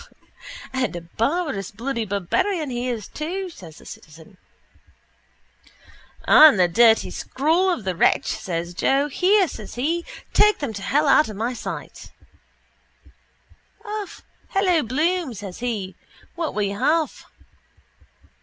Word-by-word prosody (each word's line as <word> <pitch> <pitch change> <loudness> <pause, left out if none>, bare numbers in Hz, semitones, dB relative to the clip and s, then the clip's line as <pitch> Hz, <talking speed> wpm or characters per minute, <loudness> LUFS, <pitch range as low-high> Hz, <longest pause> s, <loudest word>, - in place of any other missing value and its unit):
_ - - -19 0.7
—And 260 -7 -1
a 175 - -5
barbarous 230 - -2
bloody 230 +2 -3
barbarian 260 - -1
he 245 +1 -2
is 225 -5 -4
too, 360 +4 -5
says 165 - -13
the - - -16
citizen. 160 +5 -13 1.9
—And 305 -10 +8
the 180 - +5
dirty 225 +5 +4
scrawl 325 +8 0
of 345 - -1
the 185 -1 -2
wretch, - - +3
says 170 -1 -4
Joe. 275 +9 +1
Here, 380 +5 +3
says 215 -7 -9
he, 320 +8 -1 0.3
take 420 0 +5
them 280 -6 -4
to 200 - -7
hell 285 +9 +1
out 290 -1 +5
of 215 - -7
my 230 +5 -2
sight, 240 - -7 1.8
Alf. 420 -2 -6 0.2
Hello, 370 -4 +2
Bloom, 305 +3 -1
says 195 -3 -8
he, 215 -6 -3 0.4
what 335 -2 -4
will 210 - 0
you 200 0 -3
have? 320 0 0
250 Hz, 135 wpm, -22 LUFS, 200-330 Hz, 1.9 s, And